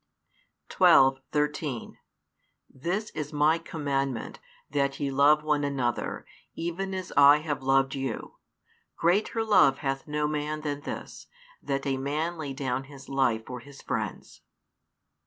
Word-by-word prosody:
12, 135 0 +5
13 150 -4 -2 0.7
This 180 +10 -3
is 150 -1 -5
My 155 +2 +3
commandment, 140 -6 -3 0.3
that 140 -1 -1
ye 140 -1 -1
love 145 +3 +4
one 150 -1 +1
another, 130 -4 -2 0.3
even 185 +3 -3
as 185 -1 -5
I 145 +1 +8
have 150 -3 -3
loved 135 0 +2
you. 135 -4 -4 0.6
Greater 205 +6 +1
love 200 -11 +5
hath 135 +1 -2
no 150 0 0
man 150 0 -2
than 145 -1 -3
this, - - -7 0.3
that 140 0 -2
a 135 -1 0
man 155 +5 -2
lay 145 -3 -4
down 135 -1 -2
his 140 -1 -13
life 120 -5 +1
for 125 -1 -6
his 140 +3 -14
friends. - - -4
145 Hz, 135 wpm, -27 LUFS, 135-155 Hz, 0.7 s, I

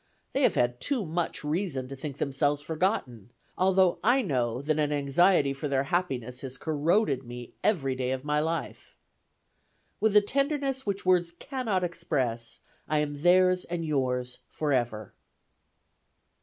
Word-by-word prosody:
They - - +1
have - - +4
had 120 0 +1
too 260 -8 +1
much 165 0 -2
reason 150 -4 -1
to 135 - -7
think 140 0 -6
themselves 145 +1 0
forgotten, 155 - -2 0.3
although 185 -1 +3
I 250 +3 +4
know 125 - -1
that 155 +1 0
an 150 -1 +1
anxiety 145 +1 +3
for 140 +2 -4
their 135 -1 +1
happiness 130 -8 -1
has 130 -1 -6
corroded 155 - +1
me 120 0 -9
every 145 -11 +1
day 130 -1 -2
of 130 0 -2
my 150 0 +1
life. 165 +2 -4 1.0
"With 220 -1 +2
a 210 - +8
tenderness 275 +2 -1
which 200 -1 -2
words 180 -2 +3
cannot 215 -1 -2
express, 130 -10 -2 0.3
I 155 - +1
am 145 -1 -2
theirs 185 +1 +4
and 170 -1 -4
yours 125 -4 -1
forever." 120 -8 -1
150 Hz, 145 wpm, -28 LUFS, 130-185 Hz, 1.0 s, a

